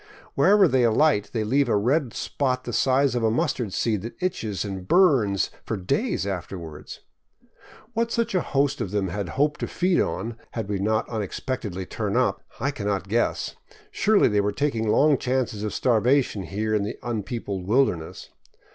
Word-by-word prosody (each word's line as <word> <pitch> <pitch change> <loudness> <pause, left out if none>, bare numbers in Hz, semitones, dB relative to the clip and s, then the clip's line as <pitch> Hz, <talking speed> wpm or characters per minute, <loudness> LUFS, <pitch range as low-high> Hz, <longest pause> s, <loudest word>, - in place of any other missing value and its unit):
Wherever 190 +7 +5
they 130 -4 +2
alight 120 -1 +3
they 110 -3 -1
leave 135 +4 +2
a 105 - +3
red 130 +5 +1
spot 130 -2 -1
the 120 - -5
size 135 +3 +3
of 120 - 0
a 110 - +4
mustard 115 -1 -1
seed 105 0 0
that 115 +4 -7
itches 110 - -2
and 95 -2 -6
burns 130 - +3
for 110 - -3
days 135 - -1
afterward. 90 -5 -6 1.0
What 230 +1 0
such 230 -3 0
a 185 - +2
host 140 -3 0
of 110 - -2
them 100 -1 -1
had 100 0 -4
hoped 150 +2 0
to - - -2
feed 180 0 +1
on, 115 0 -3 0.2
had 110 -4 -3
we 100 -1 -2
not 110 +3 +1
unex 110 -5 -4
pectedly 100 -8 -3
turned - - -2
up, - - +1 0.2
I 140 - 0
cannot 100 -5 -3
guess; 120 +3 0 0.4
surely 215 0 +3
they 105 -2 +2
were 105 +1 0
taking 115 -2 -1
long 140 +5 +4
chances 125 -5 -1
of 105 0 -2
starvation 120 -3 +2
here 110 +2 -2
in 105 - +2
the 105 +3 -4
unpeopled 105 -4 -4
wilderness. 105 -9 0
115 Hz, 175 wpm, -25 LUFS, 100-140 Hz, 1.0 s, Wherever